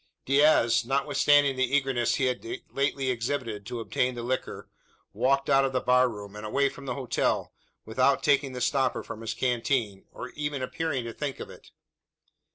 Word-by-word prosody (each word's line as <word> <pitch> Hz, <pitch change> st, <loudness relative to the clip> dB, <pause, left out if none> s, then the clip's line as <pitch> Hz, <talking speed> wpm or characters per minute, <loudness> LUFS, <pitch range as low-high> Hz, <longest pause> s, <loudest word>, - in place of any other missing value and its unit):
Diaz, 135 Hz, -4 st, +4 dB
notwithstanding 140 Hz, +1 st, +3 dB
the 130 Hz, +1 st, +1 dB
eagerness 135 Hz, -4 st, 0 dB
he 130 Hz, -, +1 dB
had 125 Hz, -1 st, -1 dB, 0.3 s
lately 140 Hz, -1 st, 0 dB
exhibited 115 Hz, -4 st, -3 dB
to 120 Hz, -1 st, -4 dB
obtain 125 Hz, +2 st, -1 dB
the 120 Hz, -, -5 dB
liquor, 130 Hz, +2 st, -3 dB, 0.5 s
walked 135 Hz, +1 st, +1 dB
out 135 Hz, 0 st, +4 dB
of 135 Hz, -1 st, -1 dB
the 130 Hz, -, +2 dB
bar 125 Hz, 0 st, +3 dB
room, 105 Hz, -2 st, -9 dB
and 105 Hz, -, -8 dB
away 140 Hz, +6 st, +1 dB
from 140 Hz, +1 st, -11 dB
the -, -, -2 dB
hotel, 135 Hz, -3 st, -1 dB, 0.3 s
without 130 Hz, +4 st, +2 dB
taking 140 Hz, -2 st, +2 dB
the 125 Hz, -, -5 dB
stopper 130 Hz, +1 st, +1 dB
from 110 Hz, -, -8 dB
his 115 Hz, 0 st, -4 dB
canteen, 120 Hz, -4 st, -1 dB
or 125 Hz, -, -8 dB
even 145 Hz, -2 st, -4 dB
appearing 135 Hz, 0 st, -2 dB
to 115 Hz, 0 st, -6 dB
think 145 Hz, 0 st, -4 dB
of -, -, -7 dB
it! -, -, -15 dB
130 Hz, 175 wpm, -27 LUFS, 120-140 Hz, 0.5 s, Diaz